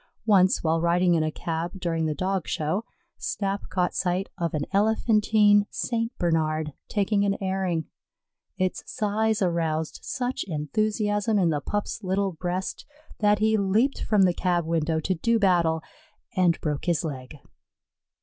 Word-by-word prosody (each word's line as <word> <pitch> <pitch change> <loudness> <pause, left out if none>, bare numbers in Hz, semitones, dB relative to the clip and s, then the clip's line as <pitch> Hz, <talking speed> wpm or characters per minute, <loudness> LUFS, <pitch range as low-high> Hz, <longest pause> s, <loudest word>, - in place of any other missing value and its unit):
Once, 190 -4 +4
while 160 0 +1
riding 175 +1 +3
in 165 - +2
a 155 0 0
cab 170 +4 -4
during 165 -3 -1
the 155 - -2
Dog 185 +2 -1
Show, 160 +9 -1 0.3
Snap 200 0 -3
caught 180 -1 0
sight 185 +1 -1
of 170 -2 -2
an 150 - -1
elephantine 210 0 +3
St. 230 -1 -2
Bernard 155 -3 0
taking 205 0 +1
an 200 -1 +1
airing. 190 -4 -1 0.7
Its 185 0 -1
size 215 -1 0
aroused 160 -3 -1
such 250 0 -3
enthusiasm 205 +7 0
in 175 -4 +3
the 145 -2 -1
Pup's 205 +7 -3
little 195 +1 0
breast 180 +2 -4 0.4
that 210 -1 +4
he 220 +1 +2
leaped 215 +7 +1
from 210 -3 +3
the 180 -2 +4
cab 175 -2 0
window 160 -1 0
to 180 +4 0
do 230 +7 +1
battle, 170 -6 +2 0.5
and 180 -3 +3
broke 150 -2 -2
his 170 -5 +1
leg. 135 -2 -6
185 Hz, 150 wpm, -26 LUFS, 165-205 Hz, 0.7 s, Once